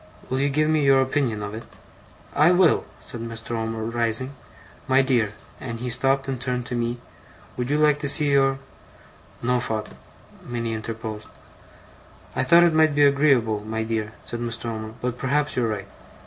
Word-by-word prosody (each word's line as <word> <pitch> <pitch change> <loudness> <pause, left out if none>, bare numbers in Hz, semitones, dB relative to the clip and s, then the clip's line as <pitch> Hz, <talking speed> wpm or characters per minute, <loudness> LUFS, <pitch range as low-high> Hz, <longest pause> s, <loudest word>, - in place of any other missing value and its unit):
Will 130 - 0
you 140 +1 +2
give 155 +2 +1
me 155 -1 +2
your 135 -1 +5
opinion 130 -5 0
of 105 0 -5
it?' 110 +2 -8 0.7
'I 155 +5 +5
will,' 180 -3 +4 0.2
said 120 - -5
Mr. 115 -1 -7
Omer, 115 -1 -2
rising. 115 +3 +1 0.5
'My 135 0 +4
dear'; 120 -6 +1 0.3
and 115 -3 -6
he 125 +1 -3
stopped 135 +2 +2
and 130 -2 -3
turned 125 -2 -2
to 125 - -4
me: 120 0 -1 0.6
'would 125 0 -3
you 145 - +2
like 150 -1 +3
to 145 -2 -1
see 145 0 +2
your 135 -1 +3 0.4
' - - -25
'No, 125 +1 +2
father,' 110 -3 -4 0.5
Minnie 115 -2 -3
interposed. 110 -1 -5 1.1
'I - - +1
thought 170 +1 +7
it 170 -2 +4
might 155 -2 +4
be 145 - +4
agreeable, 140 -7 +3
my 110 +2 -3
dear,' 110 -1 -3
said 120 - -5
Mr. 120 0 -3
Omer. 110 -1 -5
'But 125 0 -3
perhaps 145 +2 0
you're 125 -2 +1
right. 100 -2 -4
125 Hz, 180 wpm, -24 LUFS, 115-140 Hz, 1.1 s, thought